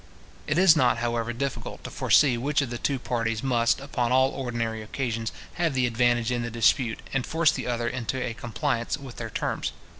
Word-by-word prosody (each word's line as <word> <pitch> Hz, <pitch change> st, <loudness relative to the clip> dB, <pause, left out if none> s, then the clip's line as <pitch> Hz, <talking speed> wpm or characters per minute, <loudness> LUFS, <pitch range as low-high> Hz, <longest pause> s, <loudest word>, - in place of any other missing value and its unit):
It 150 Hz, -, 0 dB
is 180 Hz, -3 st, +7 dB
not, 130 Hz, -5 st, +3 dB
however, 120 Hz, 0 st, -1 dB
difficult 135 Hz, +3 st, -4 dB
to -, -, -7 dB
foresee 140 Hz, -5 st, +4 dB
which 140 Hz, +4 st, 0 dB
of 125 Hz, -, -5 dB
the 120 Hz, -, -4 dB
two 140 Hz, -, 0 dB
parties 115 Hz, -2 st, -2 dB
must, 120 Hz, -3 st, +2 dB
upon 130 Hz, -3 st, -2 dB
all 130 Hz, +1 st, +4 dB
ordinary 115 Hz, -4 st, -3 dB
occasions, 115 Hz, 0 st, -3 dB, 0.3 s
have 165 Hz, -5 st, +1 dB
the 130 Hz, -1 st, +2 dB
advantage 120 Hz, 0 st, +2 dB
in 120 Hz, -1 st, 0 dB
the 120 Hz, -, -3 dB
dispute, 115 Hz, 0 st, +2 dB
and 135 Hz, -2 st, +1 dB
force 160 Hz, +3 st, +3 dB
the -, -, -4 dB
other 120 Hz, -1 st, -1 dB
into 125 Hz, +1 st, -3 dB
a 125 Hz, -2 st, -2 dB
compliance 115 Hz, +1 st, -2 dB
with 135 Hz, -4 st, -10 dB
their -, -, -5 dB
terms. -, -, -2 dB
120 Hz, 200 wpm, -26 LUFS, 115-135 Hz, 0.3 s, is